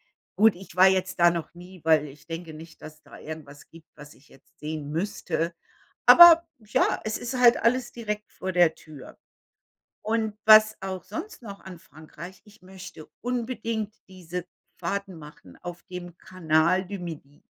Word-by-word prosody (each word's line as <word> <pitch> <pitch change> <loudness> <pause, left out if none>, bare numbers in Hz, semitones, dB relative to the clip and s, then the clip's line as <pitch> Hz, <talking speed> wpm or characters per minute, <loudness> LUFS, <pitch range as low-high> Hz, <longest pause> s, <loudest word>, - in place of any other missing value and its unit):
da - - -80 0.2
gut, 220 -4 +6
ich 185 -2 -14
war 185 +1 +7
jetzt 185 -1 0
da 175 0 +6
noch 170 0 -5
nie, 180 +1 -13
weil 155 -2 +3
ich 140 +1 -16
denke 165 -1 -7
nicht, 160 +1 -13
dass 155 0 -12
da - - -14
irgendwas 150 -2 -10
gibt, 165 -1 -17
was 150 0 -13
ich 145 - -24
jetzt 135 - -24
sehen 150 -1 -6
müsste. 170 -1 -3 0.5
Aber 340 -1 +9
ja, 215 -2 0
es 215 - -2
ist 245 +2 -5
halt 240 -1 +6
alles 240 +1 0
direkt 210 -2 -5
vor 190 - -5
der 175 -2 +4
Tür. 150 -4 -14 0.9
Und 220 -1 -1
was 215 0 +7
auch 190 -2 -5
sonst 250 - -8
noch 200 -2 -9
an 185 -2 -11
Frankreich 170 +2 -13
ich 210 -2 -20
möchte 185 -4 -12 0.2
unbedingt 230 -3 -3
diese 180 -2 -7 0.3
Fahrten 195 +2 -4
machen 150 - -14
auf 175 0 -8
dem 175 -2 -9
Canal 185 +1 +1
du 200 0 -6
Midi. 150 -4 -9
180 Hz, 165 wpm, -25 LUFS, 160-210 Hz, 0.9 s, Aber